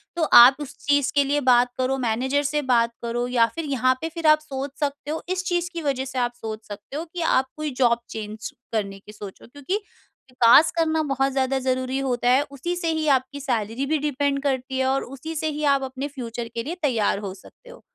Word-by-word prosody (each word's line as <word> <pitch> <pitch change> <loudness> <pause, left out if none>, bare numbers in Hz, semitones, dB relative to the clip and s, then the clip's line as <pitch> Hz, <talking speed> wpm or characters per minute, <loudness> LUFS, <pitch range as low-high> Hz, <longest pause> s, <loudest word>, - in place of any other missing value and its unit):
तो 340 - 0
आप 245 +3 +9
उस 285 -2 -7
चीज़ 285 -1 +2
के 285 - +5
लिए 285 +1 +1
बात 245 0 +5
करो, 260 +1 +1
मैनेजर 260 +4 0
से 295 +1 0
बात 235 -3 +2
करो 240 +1 -2
या 240 -2 +4
फिर 330 - -3
यहाँ 255 -2 +2
पे 325 - -2
फिर 330 -1 -2
आप 305 0 +6
सोच 275 -2 -5
सकते 290 0 -3
हो 320 - -3
इस 370 0 -1
चीज़ 350 -1 0
की 340 - -4
वजह 270 -2 -1
से 265 -1 -4
आप 245 0 0
सोच 220 -2 -7
सकते 205 +7 -8
हो 315 - -3
कि 355 - -4
आप 265 -5 +2
कोई 305 -1 -3
जॉब 235 -2 +4
चेंज 215 0 -6 0.2
करने 200 -3 -2
की 205 - -13
सोचो 205 -2 -10
क्योंकि 285 +9 -4 0.6
विकास 250 +5 +6
करना 320 -1 +2
बहुत 275 -2 0
ज़्यादा 265 0 +1
ज़रूरी 260 +1 0
होता 245 -2 0
है, 255 +3 +5
उसी 315 +6 -3
से 350 -1 -3
ही 315 -1 -1
आपकी 260 +2 -9
सैलरी 240 -2 -2
भी 310 +2 +1
डिपेंड 285 -1 -1
करती 265 -1 -1
है 260 - +2
और 270 +1 +1
उसी 275 +5 -8
से 315 0 -1
ही 300 0 -4
आप 270 - -2
अपने 265 +1 -4
फ्यूचर 240 -4 -6
के 230 - -2
लिए 325 +7 -4
तैयार 230 -8 +1
हो 190 - -5
सकते 205 - -17
हो। - - -13
270 Hz, 225 wpm, -24 LUFS, 245-295 Hz, 0.6 s, आप